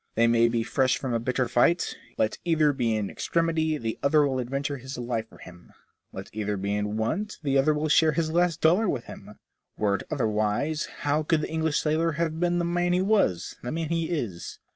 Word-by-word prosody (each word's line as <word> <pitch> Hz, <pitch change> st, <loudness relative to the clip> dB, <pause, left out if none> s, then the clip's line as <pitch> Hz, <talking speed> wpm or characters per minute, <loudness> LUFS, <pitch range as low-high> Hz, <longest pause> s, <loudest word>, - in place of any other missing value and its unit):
They 115 Hz, -, +4 dB
may 115 Hz, 0 st, +4 dB
be 115 Hz, -1 st, 0 dB
fresh 130 Hz, +2 st, +1 dB
from 130 Hz, -3 st, -3 dB
a 115 Hz, -, +1 dB
bitter 125 Hz, +1 st, -1 dB
fight, 125 Hz, +9 st, +2 dB, 0.2 s
yet, 120 Hz, -, -31 dB
let 110 Hz, -, 0 dB
either 155 Hz, -4 st, +3 dB
be 120 Hz, -4 st, 0 dB
in 105 Hz, -2 st, -2 dB
extremity, 160 Hz, -2 st, 0 dB
the 115 Hz, -4 st, -4 dB
other 145 Hz, +1 st, +4 dB
will 135 Hz, -2 st, -1 dB
adventure 140 Hz, +3 st, -3 dB
his 130 Hz, +1 st, -8 dB
life 120 Hz, -2 st, -3 dB
for -, -, -16 dB
him; 90 Hz, -1 st, -14 dB, 0.4 s
let 95 Hz, 0 st, -8 dB
either 105 Hz, -1 st, -2 dB
be 100 Hz, +1 st, -2 dB
in 105 Hz, +1 st, -2 dB
want, 170 Hz, -, -2 dB
the 140 Hz, -2 st, 0 dB
other 145 Hz, +3 st, +3 dB
will 150 Hz, +1 st, -1 dB
share 155 Hz, +1 st, +4 dB
his 160 Hz, -1 st, -1 dB
last 170 Hz, -1 st, +1 dB
dollar 180 Hz, +6 st, +4 dB
with 125 Hz, -, -2 dB
him. -, -, -11 dB, 0.4 s
Were 100 Hz, -2 st, +1 dB
it -, -, -8 dB
otherwise, 110 Hz, +6 st, 0 dB, 0.2 s
how 145 Hz, +2 st, +1 dB
could 155 Hz, 0 st, +1 dB
the -, -, -4 dB
English 160 Hz, -1 st, 0 dB
sailor 160 Hz, +1 st, +1 dB
have 160 Hz, 0 st, -2 dB
been 175 Hz, 0 st, +1 dB
the 175 Hz, -, 0 dB
man 175 Hz, +1 st, +1 dB
he 180 Hz, -, +2 dB
was, 195 Hz, -, +1 dB
the 120 Hz, -, -5 dB
man 160 Hz, -1 st, -3 dB
he 165 Hz, -1 st, -1 dB
is 120 Hz, -, -4 dB
140 Hz, 220 wpm, -26 LUFS, 115-160 Hz, 0.4 s, They